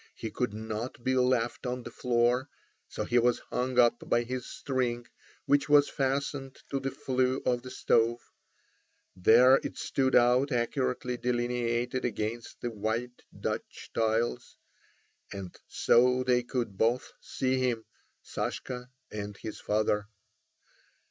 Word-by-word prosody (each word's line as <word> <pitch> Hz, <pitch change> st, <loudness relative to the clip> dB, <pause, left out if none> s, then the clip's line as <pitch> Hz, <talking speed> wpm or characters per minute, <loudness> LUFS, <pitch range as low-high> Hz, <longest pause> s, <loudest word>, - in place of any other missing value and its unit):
He -, -, -5 dB
could -, -, -1 dB
not 110 Hz, +3 st, -5 dB
be 130 Hz, +1 st, +1 dB
left 125 Hz, -1 st, +1 dB
on 125 Hz, 0 st, -3 dB
the 120 Hz, -, -8 dB
floor, 125 Hz, +2 st, +1 dB, 0.4 s
so -, -, -4 dB
he 120 Hz, -, +3 dB
was 120 Hz, 0 st, +3 dB
hung 125 Hz, 0 st, -1 dB
up 120 Hz, -1 st, +3 dB
by 120 Hz, -, +3 dB
his 125 Hz, +1 st, -4 dB
string, 125 Hz, -3 st, -2 dB, 0.4 s
which 145 Hz, +1 st, +2 dB
was 145 Hz, -1 st, +6 dB
fastened 135 Hz, 0 st, -2 dB
to 135 Hz, -, 0 dB
the 135 Hz, 0 st, -2 dB
flue 130 Hz, 0 st, 0 dB
of 125 Hz, -1 st, +1 dB
the 130 Hz, -, -9 dB
stove. 115 Hz, -1 st, +2 dB, 1.0 s
There 125 Hz, +8 st, +7 dB
it -, -, -6 dB
stood 130 Hz, -1 st, 0 dB
out 125 Hz, +4 st, +4 dB
accurately 125 Hz, 0 st, -1 dB
delineated 120 Hz, 0 st, -1 dB
against 115 Hz, 0 st, -3 dB
the 120 Hz, -, -2 dB
white 115 Hz, +3 st, -3 dB, 0.2 s
Dutch -, -, -4 dB
tiles. 115 Hz, +2 st, 0 dB, 0.7 s
And 95 Hz, -3 st, -7 dB
so 125 Hz, +1 st, +3 dB
they 125 Hz, -1 st, +3 dB
could 120 Hz, -5 st, -3 dB
both 120 Hz, +3 st, +1 dB
see 130 Hz, 0 st, -1 dB
him, 120 Hz, -3 st, 0 dB, 0.4 s
Sashka 125 Hz, -1 st, -4 dB, 0.2 s
and 105 Hz, -1 st, -5 dB
his 110 Hz, -, -7 dB
father. 105 Hz, -1 st, 0 dB
125 Hz, 135 wpm, -29 LUFS, 115-130 Hz, 1.0 s, There